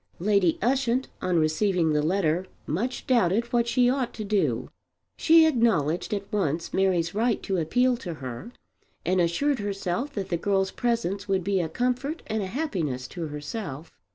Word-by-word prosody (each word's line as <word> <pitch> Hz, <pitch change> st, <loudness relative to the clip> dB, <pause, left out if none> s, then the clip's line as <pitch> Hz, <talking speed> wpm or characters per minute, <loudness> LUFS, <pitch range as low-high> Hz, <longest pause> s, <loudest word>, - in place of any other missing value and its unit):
Lady 195 Hz, -2 st, +2 dB
Ushant 260 Hz, 0 st, +1 dB
on 180 Hz, -2 st, +1 dB
receiving 165 Hz, +1 st, +2 dB
the 150 Hz, -, +2 dB
letter 175 Hz, +1 st, +1 dB, 0.2 s
much 235 Hz, -, -2 dB
doubted 230 Hz, -3 st, +2 dB
what 235 Hz, -1 st, +2 dB
she 245 Hz, +1 st, +3 dB
ought 255 Hz, -1 st, 0 dB
to 220 Hz, -, -5 dB
do. 205 Hz, -1 st, 0 dB, 0.5 s
She 325 Hz, 0 st, +6 dB
acknowledged 195 Hz, -, +1 dB
at 200 Hz, -2 st, -1 dB
once 165 Hz, -5 st, -1 dB
Mary's 180 Hz, -3 st, +1 dB
right 225 Hz, +2 st, 0 dB
to 190 Hz, -, -1 dB
appeal 245 Hz, +10 st, +2 dB
to 175 Hz, -8 st, -6 dB
her, 130 Hz, -, -7 dB, 0.5 s
and 185 Hz, 0 st, +2 dB
assured 250 Hz, +12 st, +1 dB
herself 205 Hz, +6 st, -3 dB
that 195 Hz, -2 st, -4 dB
the 170 Hz, -, 0 dB
girl's 195 Hz, +1 st, 0 dB
presence 215 Hz, -5 st, -1 dB
would 190 Hz, -2 st, +1 dB
be 195 Hz, +1 st, +1 dB
a 165 Hz, -3 st, -1 dB
comfort 250 Hz, -, -2 dB
and 220 Hz, 0 st, -2 dB
a 190 Hz, -, -3 dB
happiness 175 Hz, -, -2 dB
to 170 Hz, -3 st, -5 dB
herself. 150 Hz, -, -6 dB
195 Hz, 165 wpm, -26 LUFS, 170-235 Hz, 0.5 s, She